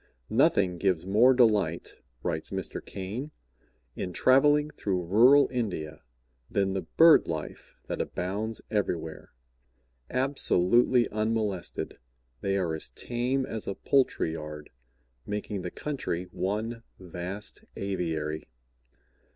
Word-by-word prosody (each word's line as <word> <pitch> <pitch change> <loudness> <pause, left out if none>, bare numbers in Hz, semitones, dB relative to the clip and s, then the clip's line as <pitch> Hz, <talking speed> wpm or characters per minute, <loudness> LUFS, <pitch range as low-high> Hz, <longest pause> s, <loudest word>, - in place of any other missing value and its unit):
"Nothing 90 -2 +3
gives 90 -3 +1
more 110 +7 +5
delight," 105 -10 +2 0.3
writes 80 -3 -2
Mr. 95 -2 -4
Caine, 105 +9 -5 0.7
"in 90 - -4
traveling 145 - +4
through 95 -8 -2
rural 125 +10 +6
India 90 - -3 0.5
than 95 -1 +1
the 95 - -1
bird 160 - +6
life 80 -2 -6
that - - -3
abounds 105 +5 -3
everywhere; 85 -7 -2 0.8
absolutely 125 -3 +3
unmolested, 110 -3 -2 0.4
they 100 0 0
are 90 -4 0
as 80 - -4
tame 125 +2 -1
as 110 -3 -4
a 100 - -2
poultry 130 - +1
yard, 75 -1 -7 0.6
making 105 -1 -3
the 90 - -4
country 130 - -3
one 110 +5 -2 0.2
vast 90 +2 -6
aviary. 80 -6 -3
100 Hz, 110 wpm, -28 LUFS, 90-120 Hz, 0.8 s, rural